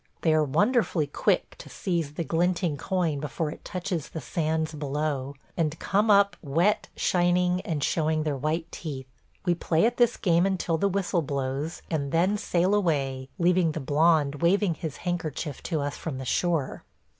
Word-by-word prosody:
They 160 - +3
are 155 0 +4
wonderfully 205 - +2
quick 145 - 0
to - - -10
seize 165 -5 -2
the 170 - -1
glinting 170 0 0
coin 165 -1 -1
before 150 +2 -3
it - - -11
touches 180 -4 -3
the 160 - -5
sands 160 +2 -1
below, 145 -2 -2 0.2
and 160 -2 0
come 205 +5 +1
up 200 0 +5
wet, 170 +8 +1
shining, 180 0 +2
and 155 -6 -3
showing 155 0 +1
their 150 -2 -1
white 155 +4 -2
teeth. 140 -5 -6 0.4
We 175 - +3
play 170 +1 +1
at 240 +1 +1
this 240 -1 +3
game 175 0 +3
until 175 -4 0
the 200 - +2
whistle 190 -2 0
blows, 140 +2 -3
and 140 -4 -1
then 180 +5 +2
sail 180 +2 +1
away, 135 -9 0
leaving 175 -2 +3
the 160 - -3
blond 150 0 +2
waving 185 +1 +3
his 160 -3 -6
handkerchief 160 -4 -3
to 160 -4 0
us 145 0 -3
from 155 -5 -5
the 130 - -6
shore. 165 0 0
165 Hz, 170 wpm, -27 LUFS, 150-180 Hz, 0.4 s, up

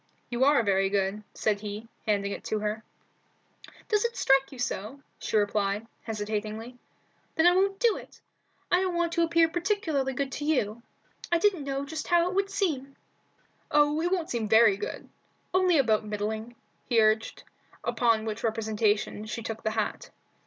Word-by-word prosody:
"You 240 +2 +1
are 285 -4 +5
very 195 -1 +2
good," 195 +1 0
said 210 -2 0
he, 210 +1 -6 0.2
handing 200 -1 +1
it - - -6
to 215 - -1
her. 210 +1 -3 1.0
"Does 425 -1 +2
it 470 0 -2
strike 270 +1 +3
you 265 - -10
so?" 235 +1 -3 0.2
she - - 0
replied, 205 0 0 0.2
hesitatingly. 215 +2 -4 0.6
"Then 320 - +3
I 355 0 +6
won't 390 +1 +2
do 470 -3 +3
it. - - -12 0.5
I 355 +1 +4
don't 370 -2 -1
want 340 -1 +1
to 335 - +1
appear 335 0 +4
particularly 325 -6 -1
good 270 +1 -2
to 295 - -5
you. 235 -7 0 0.5
I 340 - +5
didn't 355 -5 +1
know 275 0 -2
just 310 +2 -5
how 345 -1 +4
it 365 - -3
would 395 +1 +1
seem." 305 -10 -2 0.7
"Oh, 295 +1 +3
it 350 +2 0
won't 350 -4 -1
seem 225 -3 -2
very 220 -2 +6
good; 200 - -6 0.5
only 365 -2 +4
about 225 -6 +3
middling," 215 +2 -4 0.3
he 235 - +3
urged, 220 0 +2 0.4
upon 230 -3 +2
which 220 0 -4
representation 215 -2 0
she 230 +1 -5
took 225 0 -5
the 220 - 0
hat. 215 -1 -3
240 Hz, 170 wpm, -28 LUFS, 215-330 Hz, 1.0 s, I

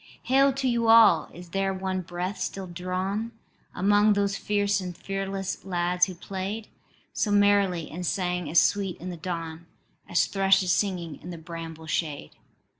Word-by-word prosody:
"Hail 275 +2 +4
to 270 0 -1
you 235 -2 +1
all: 225 -1 +6
is 175 0 -12
there 195 +1 -1
one 185 0 -2
breath 180 +3 -4
still 195 -1 -4
drawn 185 +5 -3 0.4
Among 205 +2 +4
those 200 -1 0
fierce 205 -1 0
and 180 -2 -6
fearless 195 0 -4
lads 180 -1 +1
who 185 - -7
played 195 +4 -5 0.4
So 215 - 0
merrily, 200 -5 +3
and 175 +4 -5
sang 180 -3 -1
as 165 - +6
sweet 195 -3 +1
in 180 +2 -6
the - - -6
dawn 165 -1 -5 0.4
As 175 - +3
thrushes 195 -1 +3
singing 175 -4 -1
in 175 - -9
the 175 - -6
bramble 165 -1 -8
shade? 155 -2 -3
185 Hz, 160 wpm, -26 LUFS, 175-200 Hz, 0.4 s, all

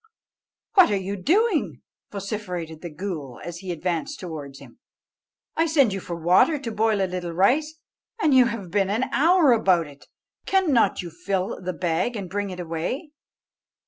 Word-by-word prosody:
"What 380 -5 +7
are 205 - +1
you 195 +1 -3
doing?" 355 - +1 0.3
vociferated 180 -6 -5
the 175 - -6
ghool, 155 -7 -6
as 170 -1 -6
he 185 -1 -5
advanced 175 - -3
towards 150 -6 -7
him; - - -15 0.8
"I 325 +1 +2
sent 280 -10 +3
you 195 - -3
for 175 -1 -6
water 180 - +4
to 250 -5 -5
boil 215 -2 +1
a - - +3
little 180 -2 -4
rice, 280 - +2 0.4
and 310 -9 +3
you 255 -1 +7
have 230 -7 -4
been 195 -1 +1
an 220 +5 0
hour 330 -1 +5
about 190 -8 +3
it. 145 -1 -15 0.4
Cannot 315 - +2
you 170 - -7
fill 185 +4 -3
the 185 0 -3
bag 175 +8 -1
and 195 -5 -6
bring 205 0 -2
it 180 -1 -7
away?" 175 - -4
195 Hz, 170 wpm, -24 LUFS, 175-250 Hz, 0.8 s, What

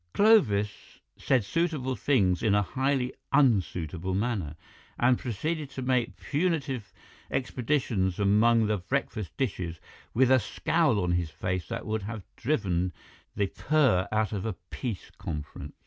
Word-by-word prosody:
Clovis 110 - +3 0.2
said 130 -4 +1
suitable 150 - -1
things 100 -7 +2
in 105 -3 +3
a 105 - +3
highly 130 +3 0 0.2
unsuitable 95 - +1
manner, 100 -8 -1 0.4
and 125 +1 +3
proceeded 150 +6 -3
to 135 -2 -6
make 125 -2 0
punitive 140 - -1 0.4
expeditions 120 -8 0
among 110 +3 +4
the 105 0 +1
breakfast 105 -1 -3
dishes 90 - -2 0.3
with 130 +2 +3
a 130 - +7
scowl 145 - +1
on 90 -2 0
his 85 -2 0
face 90 +2 -3
that 115 -1 -5
would 110 0 -1
have 105 0 -6
driven 95 - 0 0.4
the 100 - +2
purr 130 -4 +2
out 110 -2 +1
of 100 -2 -2
a 110 - -2 0.2
peace 115 -8 -5
conference. 75 -2 -6
110 Hz, 135 wpm, -28 LUFS, 95-130 Hz, 0.4 s, a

